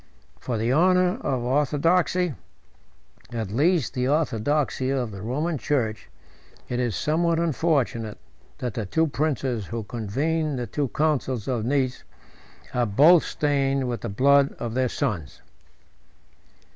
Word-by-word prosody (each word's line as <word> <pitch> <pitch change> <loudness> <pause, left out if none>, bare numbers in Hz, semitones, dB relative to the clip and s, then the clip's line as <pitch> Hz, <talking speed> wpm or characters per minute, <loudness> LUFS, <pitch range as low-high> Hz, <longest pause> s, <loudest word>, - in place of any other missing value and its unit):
80 - - -28
For 120 - -3
the 115 +3 0
honor 180 - +3
of 130 - -1
orthodoxy, 155 +6 +1 1.0
at 110 -5 -4
least 155 - +2
the 125 0 -1
orthodoxy 145 -1 0
of 130 -4 -1
the 100 -1 -8
Roman 145 - -2
church, 120 -8 -1 0.6
it 125 - -2
is 120 -5 0
somewhat 165 +2 +1
unfortunate, 140 -9 0 0.4
that 125 -3 -4
the 110 -3 -4
two 160 +10 +2
princes 135 - -1
who 115 -1 -4
convened 140 +8 -2
the 120 - -2
two 145 +3 -2
councils 130 -6 -1
of 120 -4 -1
Nice 130 -1 0 0.7
are 120 -1 +1
both 150 - +6
stained 140 -2 0
with 120 -1 -3
the 115 - -4
blood 140 +6 +4
of 115 -2 -5
their 130 0 +1
sons. 80 -12 -3
135 Hz, 135 wpm, -25 LUFS, 120-155 Hz, 1.0 s, both